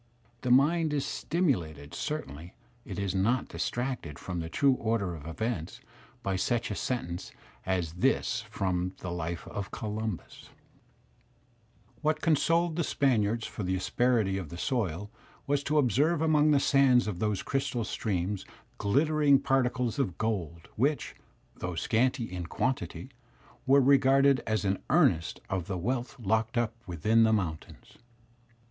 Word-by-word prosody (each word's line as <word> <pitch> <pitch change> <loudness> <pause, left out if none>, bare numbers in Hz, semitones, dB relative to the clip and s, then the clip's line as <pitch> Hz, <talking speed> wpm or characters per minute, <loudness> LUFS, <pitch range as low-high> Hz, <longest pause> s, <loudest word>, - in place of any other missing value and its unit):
The 125 - -2
mind 150 +5 +4
is 145 -2 0
stimulated, 85 - -1
certainly 90 - -5 0.3
it - - -7
is 100 -2 -1
not 110 +7 +1
distracted 120 - -3
from 90 -2 -5
the 80 0 -4
true 140 +9 +3
order 110 -7 -1
of 80 -2 -9
events, 90 -1 -3 0.4
by 95 -1 0
such 120 +4 0
a - - -2
sentence 90 -10 -3 0.4
as 90 -4 -1
this 110 +2 +1
from 90 -3 -1
the 90 - -4
"life 85 -1 -4
of 100 -2 -5
Columbus'*: 110 -3 -5 1.5
"What 155 0 +1
consoled 165 +1 +2
the 170 - +1
Spaniards 115 -6 +1
for - - -6
the 95 -1 0
asperity 105 0 +1
of 85 -6 -7
the 85 - -8
soil 105 -3 -2 0.3
was 140 0 0
to 150 +1 +1
observe 145 - +3
among 155 -1 +4
the 145 -2 +5
sands 135 -3 +4
of 105 -5 -4
those 105 -2 -1
crystal 135 -3 -1
streams 100 -2 -2 0.4
glittering 145 +6 +3
particles 125 -2 0
of 95 -11 -1
gold, 85 -7 -3
which, 140 +6 0 0.4
though 90 0 -4
scanty 120 +8 +1
in 90 -5 -5
quantity, 130 +5 -2 0.6
were 140 +1 +6
regarded 135 0 +5
as 110 -2 0
an 95 0 0
earnest 130 - +2
of 95 -3 -2
the 95 -2 -2
wealth 120 +7 -3
locked 110 +2 0
up 115 -2 +1
within 100 +7 +2
the 110 -1 +5
mountains." 90 -8 -3
110 Hz, 140 wpm, -29 LUFS, 90-135 Hz, 1.5 s, were